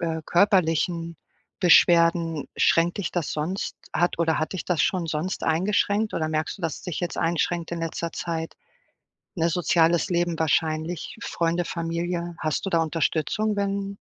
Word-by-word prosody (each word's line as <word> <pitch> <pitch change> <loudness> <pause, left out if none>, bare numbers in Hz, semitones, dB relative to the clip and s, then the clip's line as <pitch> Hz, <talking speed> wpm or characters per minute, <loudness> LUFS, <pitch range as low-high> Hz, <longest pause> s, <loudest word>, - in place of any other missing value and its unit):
äh, 160 -2 -2
körperlichen 170 -3 +2 0.4
Beschwerden, 170 -3 +4
schränkt 170 +4 +3
dich 200 - -2
das 170 -4 -2
sonst 165 +6 -3 0.2
hat 175 -1 +1
oder 165 -1 +1
hat 155 - -2
dich 190 - -4
das 180 -4 +1
schon 180 -3 0
sonst 160 +5 -3
eingeschränkt 205 +5 +1
oder 155 -1 -1
merkst 155 +5 -2
du, - - -13
dass 160 -3 -1
es - - -12
dich 180 -5 -4
jetzt 175 - -3
einschränkt 170 0 -1
in 170 - -3
letzter 165 0 -3
Zeit? 165 -1 -4 0.8
Ne, 170 0 +1
soziales 170 +2 +2
Leben 175 -1 0
wahrscheinlich 160 +3 -1
Freunde, 170 -2 -1
Familie? 170 0 -3
Hast 155 +4 -1
du - - -1
da 165 -2 +2
Unterstützung, 165 +6 0
wenn 200 0 -2
170 Hz, 155 wpm, -25 LUFS, 160-180 Hz, 0.8 s, Beschwerden